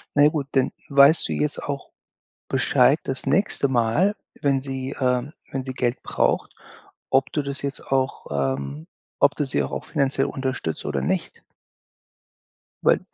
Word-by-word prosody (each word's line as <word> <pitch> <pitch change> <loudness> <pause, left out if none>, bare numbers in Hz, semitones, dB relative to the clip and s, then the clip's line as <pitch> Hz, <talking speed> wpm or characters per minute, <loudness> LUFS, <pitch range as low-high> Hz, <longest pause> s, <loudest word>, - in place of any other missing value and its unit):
na 145 - +6
ja 150 - +7
gut, 150 -3 -3
dann 130 -2 +2 0.2
weißt 140 +3 +6
du - - 0
jetzt 75 0 -1
auch - - -5 0.6
Bescheid - - +4
das 135 -1 -4
nächste 150 -1 +2
Mal, 130 - +2 0.3
wenn 140 -2 +2
sie 135 -1 -5
ähm, 125 +3 +1 0.2
wenn 135 -1 -2
sie 130 - -4
Geld 120 -1 -1
braucht, - - 0 0.6
ob 135 0 +2
du 150 - +1
das 140 0 -3
jetzt 140 0 -2
auch 135 0 +1
ähm, 70 +2 -2 0.3
ob - - +4
du 145 - 0
sie 100 - 0
auch 65 - -5
auch - - -4
finanziell 140 -2 0
unterstützt 130 - -3
oder 70 -2 -1
nicht? 65 - -2 1.4
Weil - - +4
135 Hz, 160 wpm, -24 LUFS, 115-140 Hz, 1.4 s, ja